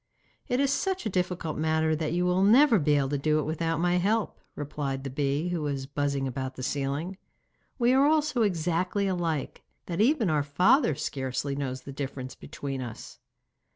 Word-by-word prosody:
'It 245 - 0
is 280 -1 +2
such 380 -6 -1
a - - 0
difficult 180 -4 -2
matter 160 0 +2
that 155 0 -2
you 175 +2 +1
will 180 +1 +2
never 230 +3 +6
be 150 -1 +3
able 140 -2 +2
to 145 0 -1
do 155 +2 +2
it 155 - +1
without 165 +1 -1
my 175 +1 +2
help,' 210 +4 0 0.2
replied 140 -2 -4
the 135 - -5
bee, 145 +4 0
who 175 -2 -2
was 140 -3 -2
buzzing 140 -1 -1
about 130 0 -4
the 130 - -7
ceiling. 145 +7 -2 0.6
'We 245 -1 +3
are 270 +2 +5
all 310 0 +4
so 275 -5 -1
exactly 180 0 0
alike, 170 -6 -2 0.2
that 175 +2 -2
even 245 -2 +3
our 155 -3 +2
father 180 - +3
scarcely 135 0 -3
knows 130 -2 -3
the 140 - -9
difference 130 -2 -5
between 135 -2 -6
us. 120 -3 -8
160 Hz, 190 wpm, -28 LUFS, 140-190 Hz, 0.6 s, never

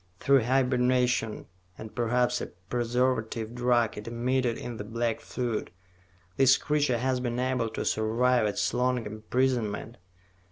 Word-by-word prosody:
Through 135 -4 +4
hibernation 125 -3 +1 0.3
and 110 0 -9
perhaps 125 +1 +1
a - - -3
preservative 115 +3 -2
drug 120 -3 +1
it 105 - -10
emitted 120 +1 0
in 120 -2 -6
the 105 - -5
black 115 +1 -2
fluid, 120 -6 -3 0.7
this 135 -1 +6
creature 145 -4 +1
has 130 +1 0
been 120 -1 -2
able 125 -2 0
to 110 - -4
survive 115 +2 +2
its 105 0 -1
long 125 -1 0
imprisonment. 110 +1 -1
120 Hz, 130 wpm, -28 LUFS, 115-125 Hz, 0.7 s, this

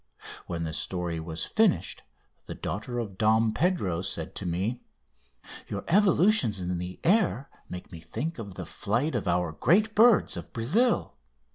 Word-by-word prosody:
When 85 -1 -3
the 80 -1 -3
story 85 +1 -2
was 80 0 -4
finished 220 -4 +1 0.5
the - - -6
daughter 115 +5 -4
of 100 -6 -5
Dom 110 0 +3
Pedro 110 - 0
said - - -3
to - - -5
me: 95 +8 -2 0.9
"Your 100 -1 -4
evolutions 185 - +3
in 90 0 -2
the 90 +1 -6
air 175 - +2 0.2
make 90 +1 -8
me 85 - -8
think 140 - -5
of 100 -4 -7
the - - -6
flight 120 +10 -1
of 110 -6 -2
our 90 -1 +1
great 205 - +2
birds 225 -2 +5
of 85 -2 -8
Brazil. 205 - +1
110 Hz, 155 wpm, -27 LUFS, -, 0.9 s, birds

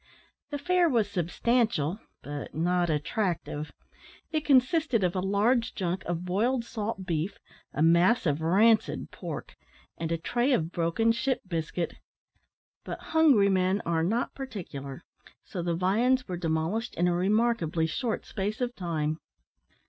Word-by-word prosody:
The 290 - -3
fare 355 +3 +2
was 230 -6 +2
substantial, 200 - 0 0.2
but 145 -1 -6
not 175 +2 +1
attractive. 155 -1 -2 0.6
It 310 -2 0
consisted 265 - +3
of 180 +1 +1
a - - +1
large 210 +6 +1
junk 185 0 -2
of 175 +1 -3
boiled 230 +7 +1
salt 215 -4 -4
beef, 170 +1 -2 0.3
a 150 - 0
mass 175 +8 +4
of 150 -1 +1
rancid 210 +7 +3
pork, - - -7 0.4
and 165 -1 -2
a 165 - +1
tray 240 - +1
of 165 -7 0
broken 175 +7 +1
ship 255 +3 0
biscuit. 165 0 -3 0.9
But - - -5 0.2
hungry 280 -11 +5
men 190 +1 +2
are 165 -1 +1
not 220 +9 0
particular, 175 - -7 0.4
so 180 - -5
the 170 0 -1
viands 235 +9 +2
were 185 - -3
demolished 170 +6 -1
in 175 +2 +2
a 175 - +2
remarkably 185 -3 +1
short 225 +8 -2
space 205 +1 -3
of 245 -1 -1
time. 155 -3 -2
190 Hz, 140 wpm, -28 LUFS, 165-235 Hz, 0.9 s, hungry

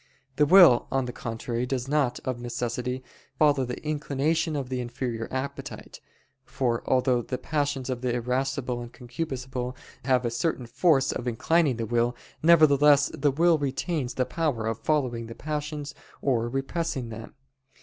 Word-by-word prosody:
The 150 - +4
will, 170 -8 +7
on 135 -1 +1
the 125 - -5
contrary, 120 +1 -3
does 130 -1 -2
not, 140 -4 +1
of 130 -2 -2
necessity, 125 +1 -3 0.3
follow 145 -3 +3
the 125 - -5
inclination 150 +2 0
of 135 -3 -3
the 130 -1 -2
inferior 120 -2 -4
appetite; 130 +2 -6 0.4
for 120 -2 -1
although 125 -1 +3
the 125 +2 -4
passions 145 -4 -2
in 125 -2 -3
the 125 -2 0
irascible 125 0 -1
and 120 0 -8
concupiscible 125 -1 -5 0.3
have 130 -2 +2
a 120 - 0
certain 125 +1 -1
force 135 +2 +2
in 125 - -4
inclining 140 +3 +2
the 115 - -2
will; 120 +2 +1 0.3
nevertheless 150 -3 +6
the 145 +1 +1
will 165 +3 +3
retains 140 0 -2
the 130 - +1
power 130 -5 -1
of 115 0 -2
following 120 -3 0
the 115 - -9
passions 150 -1 -4 0.3
or 120 -4 0
repressing 135 0 -2
them. 110 0 -9
130 Hz, 155 wpm, -26 LUFS, 120-145 Hz, 0.4 s, will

